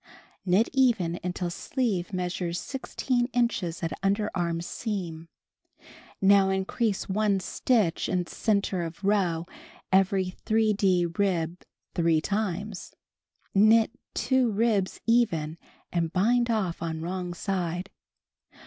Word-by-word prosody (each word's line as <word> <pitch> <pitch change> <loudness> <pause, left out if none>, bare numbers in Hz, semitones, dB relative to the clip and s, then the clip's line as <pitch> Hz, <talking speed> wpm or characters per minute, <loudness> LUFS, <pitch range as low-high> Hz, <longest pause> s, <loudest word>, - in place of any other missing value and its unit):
Knit 190 +6 +4
even 225 -11 +2
until 180 -1 -2
sleeve 205 -3 -2
measures 180 -2 -2
1() 255 -2 -1
inches 210 -9 0
at 165 - -1
underarm 190 -4 0
seam. 175 -6 -4 0.9
Now 195 -1 +5
in 190 0 0
crease 220 -2 -1
one 200 0 +1
stitch 200 -2 +1
in 180 -1 0
center 200 -2 0
of 165 +4 -7
row 185 -5 +1 0.5
every 190 -1 +2
3d 200 -6 +2
rib 175 -3 0 0.3
3 165 -2 +3
times; 200 +1 -3 0.6
knit 220 +3 +5 0.2
2 260 -3 +2
ribs 210 -3 +1
even 170 -10 +1 0.3
and 165 -2 0
bind 235 +6 +2
off 200 -7 -1
on 160 -1 -3
wrong 180 +1 -4
side. 180 -1 -2
190 Hz, 110 wpm, -27 LUFS, 175-215 Hz, 0.9 s, Now